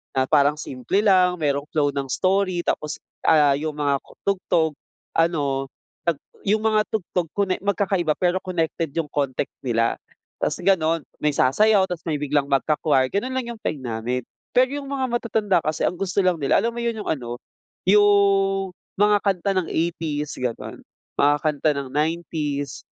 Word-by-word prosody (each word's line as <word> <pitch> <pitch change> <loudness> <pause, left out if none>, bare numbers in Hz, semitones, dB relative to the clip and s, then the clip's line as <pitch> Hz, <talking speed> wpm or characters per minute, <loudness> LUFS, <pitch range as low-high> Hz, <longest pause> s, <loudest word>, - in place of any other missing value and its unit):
na 130 0 +2
parang 145 +1 +4
simple 135 +9 -2
lang, 185 -3 +4
mayroong 145 -1 0
flow 145 -2 +2
ng 135 -1 -2
story 185 -2 +1
tapos, 150 0 -2 0.2
ah, 145 -3 +5
yung 150 +1 -3
mga 140 -1 +1 0.3
tugtog, 170 -5 +1 0.4
ano, 140 -5 0 0.3
'pag 170 -4 +1 0.3
yung 210 +2 +2
mga 215 -1 +3
tugtog 180 -5 -2
konek 195 -2 -1
magkakaiba 195 -5 +1
pero 180 +1 +1
connected 165 -3 -2
yung 165 -3 -1
context 140 -2 -2
nila. 115 -2 +1 0.4
Tapos - - -1
gano'n, 165 -4 +2 0.2
may 150 0 +1
sasayaw 190 +9 +3
tapos 175 -2 -5
may 150 -2 -1
biglang 145 0 +1
magka-choir, 135 -1 +2
ganun 205 - -2
lang 260 -2 -2
yung - - -18
peg 150 - -2
namin. 120 0 -2 0.4
Pero 255 +1 +6
yung 275 - -8
mga 270 -2 -1
matatanda 220 -5 +1
kasi 155 0 -1
ang 180 - -2
gusto 195 0 -1
lang 185 -1 +3
nila, 140 - +3
alam 230 0 -1
mo 235 - -4
yun, 235 -1 -1
yung - - -10
ano, 120 -5 -3 0.5
yung 195 -1 +4 0.3
mga 210 0 +5
kanta 195 -1 +1
ng 180 - 0
80s, 160 -3 -2
ganun, 125 -2 -5 0.3
mga 145 +1 +4
kanta 155 0 +1
ng 135 - -5
90s, 150 -2 -2
165 Hz, 160 wpm, -23 LUFS, 145-195 Hz, 0.5 s, Pero